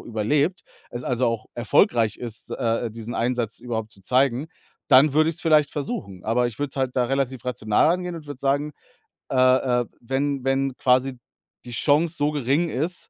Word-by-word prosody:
überlebt, 140 - 0 0.3
es 120 +1 -6
also 125 0 0
auch 115 -2 -1
erfolgreich 115 -2 +2
ist, 115 -2 -7
äh, 115 0 -1
diesen 115 +1 -7
Einsatz 120 -2 -1
überhaupt 110 -3 -4
zu 100 - -18
zeigen, 130 - +1 0.4
dann 135 +3 +6
würde 155 +2 +3
ich 165 - -2
es - - -11
vielleicht 155 -3 +4
versuchen. 100 -10 -5
Aber 120 +2 +2
ich 120 - -7
würde 145 -1 -2
es - - -16
halt 130 -1 -1
da 125 - +3
relativ 130 -1 -2
rational 125 +4 +2
angehen 180 -1 -3
und 160 -3 -9
würde 145 -3 -8
sagen, 140 +2 0 0.6
äh, - - -3 0.5
äh: - - -13
„Wenn 135 +2 -2
wenn 135 -1 0
quasi 130 0 +2 0.5
die 120 - -8
Chance 150 +7 +2
so 145 -1 0
gering 145 +4 0
ist, 160 +7 -3
130 Hz, 185 wpm, -24 LUFS, 120-145 Hz, 0.6 s, dann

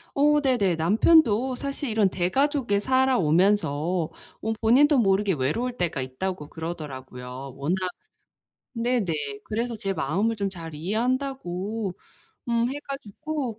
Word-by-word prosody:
어 295 +1 +4
네네. 240 - +2
남편도 230 - +4
사실 275 0 -3
이런 215 -3 +3
대가족에 230 - +1
살아오면서 185 - +2 0.3
어 220 0 0
본인도 270 +5 +5
모르게 195 -1 +3
‘외로울 175 - -1
때가 165 -6 -1
있다.‘고 150 +4 -4
그러더라고요. 135 -5 -7
워낙 145 +6 0 1.0
네네. 230 -6 0 0.3
그래서 230 +2 -2
제 195 -2 -2
마음을 190 +8 0
좀 200 -2 -1
‘잘 165 -4 -8
이해한다.‘고 215 - -2 0.6
음 235 +1 +2
해 290 - -5
가지고 275 -1 -4
205 Hz, 280 characters per minute, -25 LUFS, 170-250 Hz, 1.0 s, 본인도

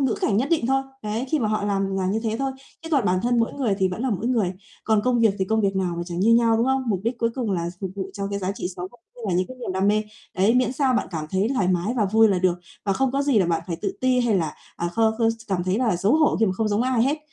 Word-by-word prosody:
ngữ 265 -5 +1
cảnh 200 - +1
nhất 260 +7 +1
định 315 -9 +2
thôi, 270 +1 +2 0.2
đấy, 215 +4 -2
khi 310 - +2
mà 220 -4 0
họ 215 -1 0
làm 195 -1 -1
là 185 -1 0
như 210 +4 0
thế 220 -1 -1
thôi, 270 0 -1 0.3
chứ 325 - -7
còn 275 -6 +3
bản 185 -1 +2
thân 240 0 +2
mỗi 230 - +1
người 240 -8 0
thì 190 -1 +2
vẫn 185 +7 -4
là 260 - 0
mỗi 210 +3 -2
người, 220 -7 +1 0.3
còn 220 -1 +3
công 245 -2 +2
việc 220 -3 +4
thì 190 - +1
công 220 +3 +1
việc 195 -1 0
nào 185 -2 0
mà 170 - -2
chẳng 175 0 -4
như 230 +3 +5
nhau, 230 -1 +4
đúng 230 +3 +1
không? 265 0 +1
Mục 195 -4 0
đích 235 +2 -1
cuối 230 0 +1
cùng 245 -5 -2
là 170 -2 -1
s - - -12
phục 190 -2 -3
vụ 190 0 -4
cho 200 0 -4
cái 200 - -2
giá 190 0 -2
trị 180 - -4
sống 180 - -5
và - - -18
cũng - - -38
như 245 - -14
là 175 - 0
những 185 +1 +1
cái 255 - -9
niềm 240 -6 -5
đam 190 +2 +1
mê, 215 +1 +2 0.3
đấy, 200 +5 +3
miễn 250 -1 +2
sao 265 -1 +1
bạn - - 0
cảm 155 -3 -4
thấy 195 +4 +1
thoải 195 -8 +1
mái 185 +6 0
và 220 - +2
vui 220 +3 +4
là 190 -3 +2
được, 185 -1 +2 0.3
và 200 - +1
không 265 +5 0
có 275 - +1
gì 280 -5 +3
là 185 - +3
bạn 165 -1 0
phải 170 -3 -3
tự - - -3
ti 255 -1 +3
hay 230 -4 +2
là, 160 -4 -1 0.2
à, 175 - -2
kho 220 +5 +2
khơ 225 -1 +3
s 225 - -3
cảm 180 -2 0
thấy 185 +3 0
là 230 -7 +1
xấu 195 +7 +1
hổ 310 -1 +3
khi 225 - +4
mà 190 - +1
không 215 +3 -1
giống 210 +3 +1
ai 255 -2 +2
hết. 285 +5 +1
215 Hz, 340 wpm, -23 LUFS, 190-245 Hz, 0.3 s, như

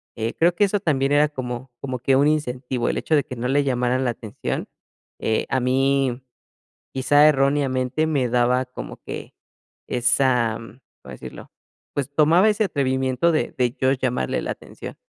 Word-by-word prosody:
eh, 115 +1 -2
creo 170 +1 +3
que 205 - +2
eso 205 +1 0
también 140 -7 0
era 145 +1 +4
como 125 -2 -6
como 130 -2 -4
que 135 +2 +2
un 140 +2 +4
incentivo, 125 -4 -2
el - - -1
hecho 155 - +1
de 145 - +2
que 125 - -7
no 120 +1 -3
le 145 +1 +3
llamaran 125 0 0
la 120 - +1
atención. 110 -2 -5 0.5
Eh, 110 - 0
a 130 - +1
mí, 130 0 +1 0.7
quizá 145 +3 +4
erróneamente, 135 0 +1
me 140 -5 +1
daba 125 +1 +2
como 125 - -8
que - - -7 0.5
esa, 120 -2 +2
¿cómo 115 +3 -15
decirlo? - - -10 0.4
Pues, 140 -1 -2
tomaba 165 +8 +5
ese 210 0 +1
atrevimiento 130 0 +1
de 155 - -1
de 125 -1 +1
yo 130 0 +3
llamarle 125 -2 -1
la - - -3
atención. - - -9
130 Hz, 165 wpm, -22 LUFS, 125-145 Hz, 0.7 s, tomaba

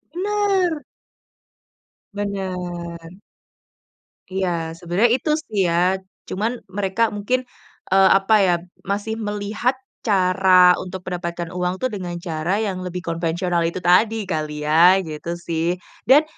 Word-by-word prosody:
Bener. 385 -5 +1 1.3
Bener. 180 -4 -5 1.1
Iya 170 -4 -2
sebenarnya 175 +7 +1
itu 300 +4 -1
sih 245 -9 -8
ya. 175 +2 +2 0.3
Cuman 225 +5 -2
mereka 195 +3 0
mungkin, 210 +5 0 0.5
eee, 190 0 +5
apa 195 +3 +3
ya, 180 -2 +4 0.3
masih 205 +3 -2
melihat 210 +3 -1 0.3
cara 185 -2 +5
untuk 185 0 -7
mendapatkan 175 -2 -4
uang 180 +3 -2
tuh 255 - +2
dengan 180 -4 -5
cara 170 +2 -2
yang 195 -4 -2
lebih 180 0 -5
konvensional 170 +1 -1
itu 170 +2 -4
tadi 215 +5 +4
kali 155 -4 -3
ya, 170 +5 +6
gitu 165 +1 -5
sih. 170 0 -1 0.3
Dan 280 +5 +7
185 Hz, 115 wpm, -21 LUFS, 175-205 Hz, 1.3 s, Dan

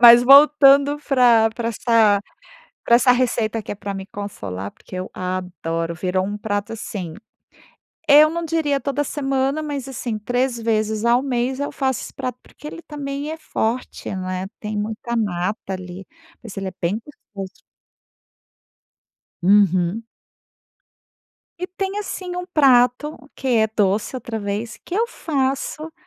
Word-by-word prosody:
Mas 240 0 +10
voltando 280 +1 +7
pra 240 -5 +5
pra 230 -1 -2
essa 220 -3 +3 0.6
pra 235 - +5
essa 250 +1 +5
receita 230 -3 0
que - - -6
é - - -4
pra 200 0 -5
me 190 - -6
consolar, 100 - -6
porque - - -12
eu 185 0 -4
adoro, 180 -2 -3
virou 185 +1 -1
um 205 +2 -3
prato, 205 0 -3
assim, 185 -6 -6 0.9
eu 300 +1 +8
não 335 +1 -3
diria 310 -4 0
toda 280 +1 -1
semana 275 +1 -1
mas, 285 -3 -4
assim, 235 -3 -4
3 245 +3 -1
vezes 220 -1 0
ao 240 +2 +4
mês 260 0 -1
eu 285 - -2
faço 265 -3 0
esse - - -9
prato, 255 -2 -5
porque - - -18
ele 305 +2 -7
também 285 0 -5
é - - -3
forte, 250 -5 -3
né, 185 0 -3
tem 210 0 -4
muita 220 +3 -3
nata 195 -1 -2
ali, 185 +1 -8 0.3
mas 225 -4 -10
ele 195 -1 -3
é - - -15
bem 180 +5 0 0.4
gostoso. 195 0 -7 1.8
Uhum. 190 +1 +3 1.6
E - - 0
tem, 385 +2 -4
assim, 370 -3 -5
um 360 - -3
prato 260 +1 +4 0.2
que 265 - -6
é 220 -3 +3
doce 205 +4 +1
outra 235 -3 -5
vez, 205 +3 -4
que 355 - -6
eu 460 +3 +2
faço 295 - -2
235 Hz, 145 wpm, -21 LUFS, 200-275 Hz, 1.8 s, Mas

